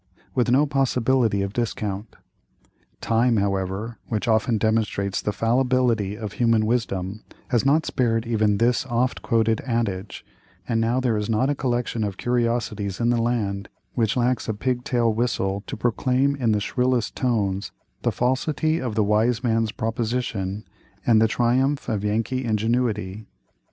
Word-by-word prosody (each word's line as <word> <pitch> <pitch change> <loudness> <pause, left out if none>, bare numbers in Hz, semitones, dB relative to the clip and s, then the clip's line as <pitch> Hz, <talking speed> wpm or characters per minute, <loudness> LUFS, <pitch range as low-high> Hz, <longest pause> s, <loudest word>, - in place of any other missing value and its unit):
with 125 -1 +1
no 135 +5 +4
possibility 130 -6 +1
of 100 0 -4
discount. 105 -3 -3 0.9
Time, 115 +1 +2
however, 100 +3 -2
which 110 0 -2
often 110 0 +2
demonstrates 105 -2 0
the 105 - -1
fallibility 120 -3 +1
of 110 -3 -5
human 115 -2 +2
wisdom, 110 -4 -2 0.3
has 125 +1 +2
not 155 +3 +3
spared 115 -2 0
even 110 -3 +2
this 120 +3 +2
oft 125 +1 0
quoted 115 -1 +1
adage; 110 -6 -2 0.4
and 115 -1 +1
now 115 +3 +1
there 120 -4 +1
is 105 +1 -2
not 125 +5 +2
a - - +2
collection 120 -4 -1
of 100 -2 -3
curiosities 115 -5 -1
in 120 0 +2
the 120 -1 +1
land 105 -4 -1 0.2
which 115 -1 0
lacks 125 -1 0
a 110 - -1
pig 125 +2 -1
tail 120 -3 +1
whistle 100 -4 -1
to - - -5
proclaim 130 +3 +1
in 120 -5 +1
the 105 - +2
shrillest 125 +2 0
tones 100 -6 -1 0.3
the - - +1
falsity 150 +5 0
of 120 -4 -3
the 110 - +3
wise 110 +4 +2
man's 115 -2 +1
proposition, 110 -3 -2 0.4
and 110 -2 +5
the 110 - +5
triumph 130 +5 +1
of 110 -4 -1
Yankee 115 +5 -1
ingenuity. 110 -3 -1
115 Hz, 150 wpm, -24 LUFS, 105-125 Hz, 0.9 s, and